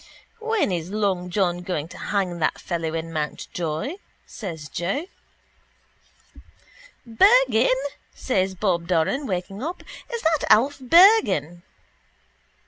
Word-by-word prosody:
—When 450 - 0
is 170 -1 -3
long 195 -3 -1
John 175 -2 0
going 175 -4 -3
to - - -11
hang 185 -4 -2
that 155 - 0
fellow 165 -2 -3
in 165 0 -5
Mountjoy? 160 - -4 0.3
says 165 -9 -7
Joe. 185 - -3 2.0
—Bergan, 260 - +4 0.4
says 190 -6 -1
Bob 175 -3 -1
Doran, 185 - 0
waking 195 +2 -4
up. 335 +6 -5 0.3
Is 470 -1 -4
that 320 -2 +1
Alf 260 +7 +4
Bergan? 265 - +4
190 Hz, 110 wpm, -23 LUFS, 170-270 Hz, 2.0 s, Bergan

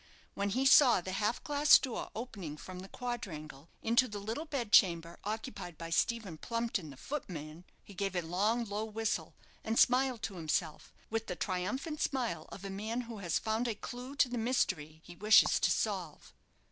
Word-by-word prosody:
When 200 0 -1
he 255 +7 0
saw 270 -5 +7
the 185 +1 -5
half 210 +4 -1
glass 290 0 +6
door 255 -4 -4
opening 200 -10 -6
from 185 +3 -9
the 190 +1 -9
quadrangle 165 - -6
into 235 +3 +4
the 210 -3 -6
little 225 +10 -4
bedchamber 185 - +3
occupied 210 -5 -5
by 165 0 -7
Stephen 195 -3 0
Plumpton, 230 -8 -2
the 135 - -11
footman, 165 - -6 0.2
he 200 - -13
gave 195 0 -2
a 175 - 0
long, 210 +8 +1
low 205 0 -3
whistle, 220 0 -2 0.3
and 225 +1 -1
smiled 255 -2 +3
to - - -3
himself, 160 0 -2 0.2
with 225 0 -2
the 180 - -3
triumphant 215 - -3
smile 235 - -1
of 195 - -9
a 195 - -4
man 220 +5 -3
who 230 -3 -8
has 175 -4 0
found 220 +2 -1
a 225 - -1
clue 250 +5 -7
to 280 - +4
the 245 -1 -3
mystery 160 - 0
he 175 - -11
wishes 215 +4 +6
to - - +3
solve. 185 -8 -2
210 Hz, 180 wpm, -33 LUFS, 175-240 Hz, 0.3 s, saw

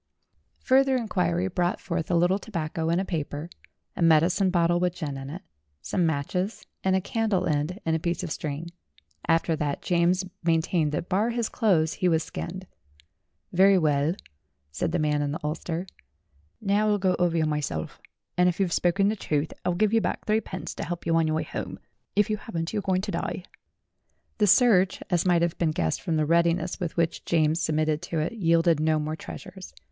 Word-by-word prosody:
Further 265 0 +4
inquiry 90 - 0
brought 175 - -1
forth 170 -3 -3
a 175 - +2
little 175 +3 +3
tobacco 165 -5 -3
in 170 +2 +2
a 195 - -1
paper, 155 -1 -4 0.4
a - - -5
medicine 170 +4 +4
bottle 175 -1 +2
with 180 0 0
gin 150 -6 -4
in 135 0 -7
it, 170 +6 -7 0.4
some 170 - 0
matches 180 +7 -2 0.2
and 190 0 +2
a 190 - +2
candle 210 -3 0
end, 155 +4 -1
and 160 -1 +1
a - - 0
piece 170 +2 -2
of 170 - -4
string. 155 +3 -4 0.6
After 165 0 +2
that 145 -3 -2
James 180 +2 +2 0.2
maintained 165 -1 +1
that 165 - -2
bar 205 +5 +1
his 235 -2 -1
clothes 170 -9 +2
he 180 - +4
was 160 -1 +2
skinned. 185 +2 -6 0.9
"Very 190 +2 +6
well," 150 0 +2 0.6
said 70 - -2
the - - +1
man 150 -2 +1
in 145 0 -1
the 160 - -4
ulster. 165 +3 -3 0.7
"Now 210 +1 +1
I'll 210 -1 +3
go 185 -2 +1
over 175 -2 +2
you 160 - +2
myself, 145 - -3 0.3
and 180 0 +4
if 175 - -4
you've 185 -3 +1
spoken 185 +3 +2
the 215 - +1
truth, 155 -6 -2
I'll 180 - 0
give 215 +3 +2
you 225 - +4
back - - -3
threepence 195 -6 -2
to - - -5
help 175 0 -5
you 165 0 +2
on 165 -1 +3
your 155 - 0
way 160 - 0
home. - - -6 0.4
If 205 -1 +3
you 215 - -1
haven't, 170 -6 -5
you're 210 - 0
going 185 -1 0
to - - -4
die." - - -3 1.0
The 210 - +4
search, 195 -4 +4
as 175 +1 +2
might 175 -1 +4
have 170 -1 -1
been 170 - +2
guessed 85 - -1
from 170 -3 -1
the 155 - +2
readiness 170 +2 +1
with 175 -2 -4
which 170 -1 0
James 160 0 +2
submitted 155 -1 0
to 170 -2 -4
it, 155 +5 0
yielded 165 -5 +3
no 155 0 +2
more 155 +1 -2
treasures. 185 +3 -10
170 Hz, 195 wpm, -26 LUFS, 155-185 Hz, 1.0 s, Very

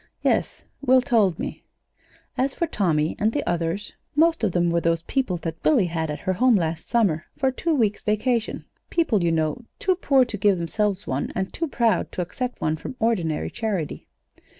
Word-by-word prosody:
"Yes; - - 0 0.2
Will 255 -1 +5
told 215 - +3
me." - - -5 0.7
"As 265 +1 0
for 340 - 0
Tommy 165 - 0
and 215 +2 +2
the 290 - -2
others 175 +4 -2 0.2
most 325 -2 +3
of 210 - +2
them 175 -1 +1
were 170 0 +1
those 165 0 +1
people 255 -5 -1
that 165 -1 -4
Billy 260 -11 +4
had 165 -2 -2
at 150 - -4
her 185 - 0
home 250 +5 +4
last 165 -3 -1
summer 195 -10 +1
for 265 - +2
a - - -5
two 325 +4 0
weeks' 215 -6 +1
vacation 220 +2 0 0.2
people, 245 - +1
you 170 - +2
know, 160 +7 0
too 380 - +2
poor 275 -8 +3
to 225 -3 -5
give 200 -1 +3
themselves 200 +3 -1
one, 130 +2 -2
and 190 0 -2
too 330 - -2
proud 230 - +1
to - - -2
accept 250 +8 -5
one 155 0 0
from 255 - -7
ordinary 180 -9 0
charity. 205 -10 -3
205 Hz, 195 wpm, -24 LUFS, 170-250 Hz, 0.7 s, Will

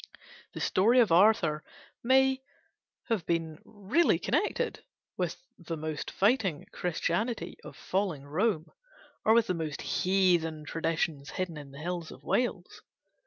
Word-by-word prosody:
The - - -6
story 230 +7 +4
of 225 -7 +4
Arthur 170 -4 +4 0.4
may 265 +1 +4 0.7
have 220 -7 +1
been 165 -2 -1
really 215 - +1
connected - - -1 0.3
with 180 -3 -2 0.2
the 165 -1 -5
most 155 -1 -4
fighting 200 - +1
Christianity 180 +6 -1
of - - -11
falling 185 -7 -2
Rome 160 +2 0 0.6
or 220 - +5
with 230 -1 +5
the 185 - -1
most 160 -4 -4
heathen 175 -5 +1
traditions 160 -2 -2
hidden 185 -3 -3
in 145 -2 -9
the 135 - -12
hills 175 -1 -4
of - - -13
Wales. 215 -8 -1
180 Hz, 130 wpm, -29 LUFS, 160-215 Hz, 0.7 s, or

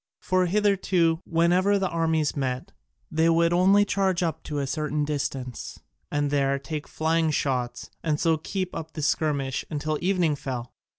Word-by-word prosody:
For 185 -1 +1
hitherto, 185 -4 +2
whenever 180 +4 +3
the 195 -1 0
armies 160 -3 0
met, 135 +5 -2 0.4
they 160 +1 +3
would 170 +1 +3
only 195 +3 +5
charge 190 -3 +1
up 165 -2 -2
to 150 - -4
a 140 - 0
certain 150 +2 -1
distance, 135 -4 -4 0.3
and 145 -1 0
there 140 -1 +2
take 150 +2 -5
flying 160 0 +1
shots, 125 -5 -2
and 150 -2 0
so 165 -2 +2
keep 185 +3 -4
up 160 0 -6
the 155 - -4
skirmish 140 -2 0
until 155 0 -2
evening 175 -4 +2
fell. 125 -4 -5
160 Hz, 160 wpm, -26 LUFS, 145-175 Hz, 0.4 s, only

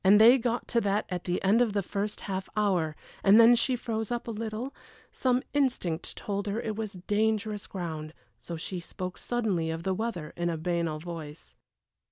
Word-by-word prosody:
they 220 +7 +8
got 240 0 -1
to 235 - +2
that 205 +1 +1
at 180 -1 -4
the 180 0 0
end 205 +5 +5
of 230 -4 +2
the 200 -1 +1
first 205 +3 -3
half 190 -1 -4
hour, 180 -7 +2 0.3
and 205 +3 +7
then 230 +1 +9
she 250 +2 +2
froze 225 -3 -3
up 240 -1 -3
a - - -2
little; 225 +4 -4 0.4
some 255 -1 +1
instinct 245 - 0
told 200 0 -3
her 205 +3 -1
it 220 -2 -3
was 215 -1 -4
dangerous 215 0 0
ground, 160 -5 -5 0.3
so 170 - -6
she 180 +2 -4
spoke 180 +2 -6
suddenly 205 -9 0
of 165 +1 -3
the 190 - +1
weather, 185 -7 -3
in 175 0 0
a 165 - -1
banal 170 -1 -1
voice. 155 - -8
200 Hz, 190 wpm, -29 LUFS, 175-225 Hz, 0.4 s, then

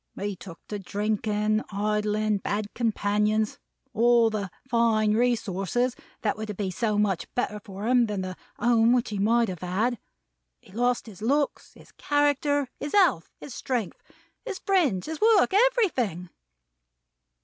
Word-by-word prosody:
He 205 0 -3
took 170 -2 -12
to 210 - -4
drinking, 210 +2 -1
idling, 210 0 0
bad 205 +1 -3
companions: 215 -1 0 0.3
all 235 0 +4
the 205 -3 -3 0.2
fine 225 -3 +2
resources 235 0 0 0.3
that 210 - +1
were 215 +1 -6
to 210 - -5
be 190 -1 -3
so 215 +1 -1
much 200 -4 0
better 210 -4 -1
for 200 -1 -7
him 245 -1 +4
than 205 -2 -3
the 185 0 -5 0.2
Home 235 +1 +4
he 205 -2 -4
might 230 +3 +3
have 180 -4 -6
had. 210 +6 -1 0.6
He - - -20
lost 245 +4 0
his 210 -4 -12
looks, 280 +5 -1
his - - -17
character, 290 -1 +1
his 290 - -5
health, 360 - +3
his 280 - -9
strength, 245 -8 -3 0.4
his 440 -6 -5
friends, 330 - +1
his 315 0 -6
work: 435 -3 +4
everything!" 335 - +1
215 Hz, 145 wpm, -26 LUFS, 205-245 Hz, 0.6 s, all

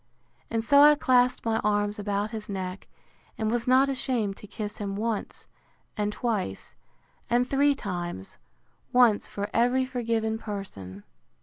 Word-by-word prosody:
And 225 -1 -1
so 280 +5 +6
I 295 +1 +8
clasped 250 -3 +2
my 225 -1 +1
arms 205 0 0
about 205 +1 -2
his 220 -2 -6
neck, 190 -1 -5 0.5
and 220 -1 -1
was 240 0 -1
not 260 +2 +5
ashamed 250 -7 -1
to 210 - -11
kiss 210 0 -6
him 200 -2 -3
once 220 +1 -3 0.5
and 210 0 -1
twice, 210 - -3 0.6
and 245 +2 +2
three 280 +1 +3
times; 175 - -6 0.5
once 245 -4 +4
for 200 0 -5
every 245 +3 +2
forgiven 230 -3 -1
person. 100 - -7
220 Hz, 140 wpm, -27 LUFS, 205-245 Hz, 0.6 s, I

